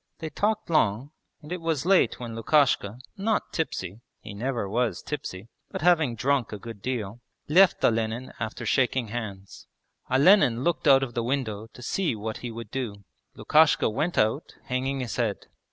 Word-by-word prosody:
They 160 -2 -6
talked 210 +3 -1
long, 130 -2 +1 0.3
and 150 - -11
it 180 -1 -3
was 165 -3 -1
late 190 0 +3
when 120 -2 -6
Lukashka, 115 -3 +2 0.2
not 210 +2 -1
tipsy 105 - -3 0.2
(he 105 - -9
never 115 0 -2
was 110 -2 -1
tipsy) 115 -8 -6 0.2
but - - -5
having 160 -8 +3
drunk 130 +1 0
a 105 - -5
good 115 0 -10
deal, 120 -2 -4 0.3
left 180 +4 +5
Olenin 115 +2 0
after 110 +1 -4
shaking 130 -3 +1
hands. 105 -4 -7 0.4
Olenin 130 - +5
looked 170 -1 0
out 135 -1 +6
of 120 -3 -5
the 120 - -1
window 115 -4 -2
to 125 - -12
see 175 -2 -1
what 110 +1 -5
he 120 - -6
would 115 -2 -8
do. 115 -6 -4 0.3
Lukashka 155 -6 +3
went 165 +10 -1
out, 110 +8 0
hanging 130 +2 -2
his 125 - -4
head. 115 -5 -1
125 Hz, 170 wpm, -26 LUFS, 110-150 Hz, 0.4 s, out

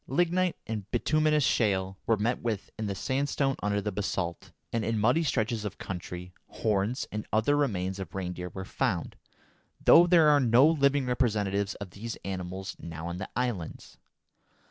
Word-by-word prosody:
Lignite 175 +5 +1
and 105 -3 -5
bituminous 155 -1 +2
shale 95 -5 +1
were 115 - +3
met 115 +4 0
with 110 -4 -3
in 110 -1 -3
the 100 - -2
sandstone 135 +4 0
under 105 0 0
the 105 +1 -2
basalt, 95 -4 -3 0.2
and, 115 -1 0
in 115 0 0
muddy 120 +10 +3
stretches 115 -7 0
of 105 - -5
country, 90 -1 -6
horns 105 +3 -1
and 105 0 -5
other 110 +7 +3
remains 95 -9 -1
of 95 -3 -7
reindeer 90 -1 -4
were 95 +2 -7
found, - - -2 0.6
though 175 +1 +7
there 170 -3 +6
are 145 -1 +6
no 125 +1 +5
living 140 -3 +3
representatives 105 -5 0
of 100 -3 -8
these 110 +5 -6
animals 95 0 -5
now 80 -1 -7
on 85 +1 -4
the 95 - -6
islands. 120 -10 -4
110 Hz, 165 wpm, -29 LUFS, 95-130 Hz, 0.6 s, though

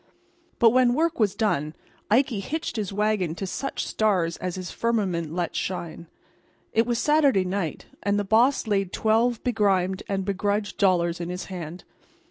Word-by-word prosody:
But 230 -1 +6
when 245 0 +4
work 330 0 0
was 205 -3 +2
done 155 -8 0 0.3
Ikey 235 0 +2
hitched 305 +10 -4
his 210 -4 -3
wagon 205 -5 0
to 195 - -4
such 275 +8 -3
stars 185 -6 +1
as 180 -1 -4
his 185 -2 -6
firmament 190 -9 -1
let 170 -1 -2
shine. 170 -2 -4 0.7
It 225 +1 +3
was 240 -1 0
Saturday 280 -8 +3
night, 180 -4 -3 0.2
and 205 0 +1
the 205 - 0
boss 235 +8 +3
laid 195 -4 0
twelve 225 +2 +1
begrimed 195 -5 +1
and 195 -1 -1
begrudged 205 +1 -1
dollars 175 -3 +2
in 170 - -4
his 180 0 -5
hand. 175 0 -7
200 Hz, 160 wpm, -25 LUFS, 180-225 Hz, 0.7 s, But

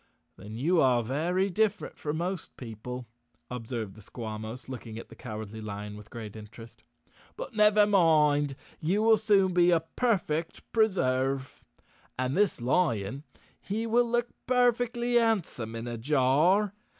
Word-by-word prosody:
"Then 105 +3 -10
you 165 +7 +3
are 125 -3 +3
very 175 - 0
different 215 +2 0
from 150 +1 -3
most 180 +1 -4
people," 125 +1 -7 0.5
observed 115 -4 -4
the 110 - -14
Squawmos, 110 +2 -7
looking 115 -4 -7
at 115 - -9
the - - -12
Cowardly 110 -2 -7
Lion 105 0 -6
with 105 0 -12
great 110 -3 -8
interest. 110 +2 -12 0.5
"But, - - -6
never 210 -1 +5
mind, 150 -7 +3 0.2
you 190 +7 +1
will 225 0 +6
soon 200 -3 +3
be 175 0 +5
a 170 -2 +4
perfect 165 -4 -1
Preserve. 135 - 0 0.5
And 130 +1 -1
this 205 -6 +2
lion—he 140 - -2
will 235 +1 +2
look 240 0 0 0.2
perfectly 245 -1 +2
handsome 190 - 0
in 115 +1 -5
a 120 -1 -5
jar. 150 - +3
150 Hz, 140 wpm, -28 LUFS, -, 0.5 s, will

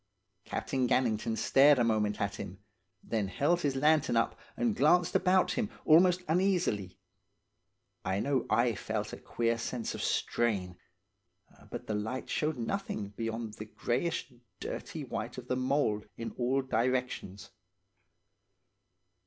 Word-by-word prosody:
Captain 130 -2 -1
Gannington 110 -3 +1
stared 140 +1 +6
a 120 - +3
moment 105 -2 +1
at 100 0 -2
him, 90 - -7 0.5
then 110 -3 -1
held 150 - +1
his 140 -4 0
lantern 150 -1 +3
up 115 - +1 0.2
and 235 -3 +1
glanced 180 -4 +4
about 185 0 +4
him 220 -4 -1 0.2
almost 180 +3 +5
uneasily. 160 - +1 1.1
I 95 +1 0
know 135 +2 0
I 120 +2 +3
felt 105 +1 -3
a - - -5
queer 115 0 -1
sense 115 0 -3
of - - -5
strain. 100 -7 0 0.9
But - - -6
the 110 - -3
light 110 +5 -3
showed 155 -2 0
nothing 115 - -3
beyond 115 +1 -4
the 110 - -7
greyish 130 +5 -2 0.3
dirty - - -5
white - - -5
of - - -8
the 125 - 0
mould 130 -5 0
in 115 -1 -4
all 130 +2 +1
directions. 125 -6 -1
120 Hz, 135 wpm, -31 LUFS, 110-150 Hz, 1.1 s, stared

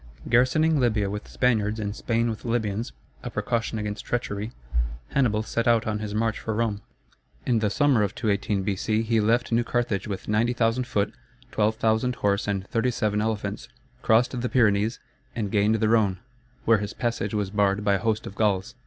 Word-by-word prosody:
Garrisoning 140 +6 +3
Libya 110 -5 +1
with 105 0 -5
Spaniards, 110 -3 +1
and 105 -1 -3
Spain 115 0 0
with 110 -2 -4
Libyans 115 -2 -1 0.3
(a - - -5
precaution 115 -1 -2
against 105 -1 -4
treachery), 110 -2 -3 0.6
Hannibal 110 -6 +1
set 115 +1 -2
out 115 -1 +4
on 105 -1 -1
his 105 -1 -4
march 110 0 0
for 110 - -3
Rome. 110 -3 -1 0.6
In 120 -3 +2
the 105 -1 +1
summer 140 0 +3
of 100 -1 -1
218 100 -3 0
B.C. 105 +3 0
he 115 0 +1
left 115 +3 +1
New 115 +1 +3
Carthage 115 -5 -1
with 100 -2 -5
90,000 115 +2 +1
foot, 105 -4 -1 0.4
12,000 110 +3 +1
horse, 100 -1 0
and 100 -2 -1
37 110 -3 0
elephants, 110 -1 -3 0.3
crossed 120 +2 +2
the 125 - -1
Pyrenees, 110 -2 +2 0.4
and 105 -4 -2
gained 105 +1 +3
the 110 0 +1
Rhone, 105 -4 +3 0.5
where 115 -1 +5
his 105 0 -4
passage 115 -4 -2
was 100 -2 -1
barred 100 -1 +1
by 100 - +4
a 100 - +1
host 110 +3 -1
of - - -7
Gauls. 105 +1 0
110 Hz, 175 wpm, -25 LUFS, 105-115 Hz, 0.6 s, where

